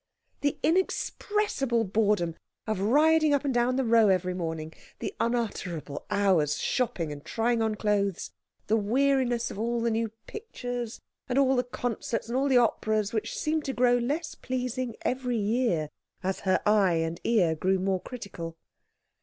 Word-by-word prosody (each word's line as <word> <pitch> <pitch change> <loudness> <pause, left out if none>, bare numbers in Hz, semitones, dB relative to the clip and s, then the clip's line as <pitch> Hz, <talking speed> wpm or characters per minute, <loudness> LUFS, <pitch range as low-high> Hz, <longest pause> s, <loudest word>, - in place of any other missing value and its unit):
The 285 -1 0
inexpressible 350 - +1
boredom 200 -5 +1 0.3
of 215 -3 -1
riding 300 +7 +4
up 285 - -1
and 275 - +1
down 245 +1 +2
the 265 - +1
Row 225 -1 +5
every 185 -1 +2
morning, 160 -3 -4 0.2
the - - -4
unutterable 200 -11 -2
hours 170 -8 +2
shopping 180 - -1
and 145 0 -8
trying 230 0 0
on 220 -1 +1
clothes, 205 -3 0 0.3
the 220 - +2
weariness 245 +2 +1
of - - -7
all 235 +1 0
the 230 0 +1
new 225 0 0 0.2
pictures, 245 - -5 0.3
and 250 - 0
all 270 -1 +4
the 250 - +2
concerts, 240 -2 -3
and 240 - -2
all 270 +2 +2
the 260 - +5
operas, 220 -2 +1
which 220 - -2
seemed 310 0 0
to 270 - -2
grow 245 -1 +4
less 295 +7 -1
pleasing 255 -2 -3
every 250 -2 -1
year, 205 -8 0 0.3
as 190 +1 -1
her - - +2
eye 205 -4 +4
and 165 0 -1
ear 190 -9 +3
grew 190 +4 +1
more 190 0 0
critical. 175 -9 -7
230 Hz, 160 wpm, -28 LUFS, 195-255 Hz, 0.3 s, Row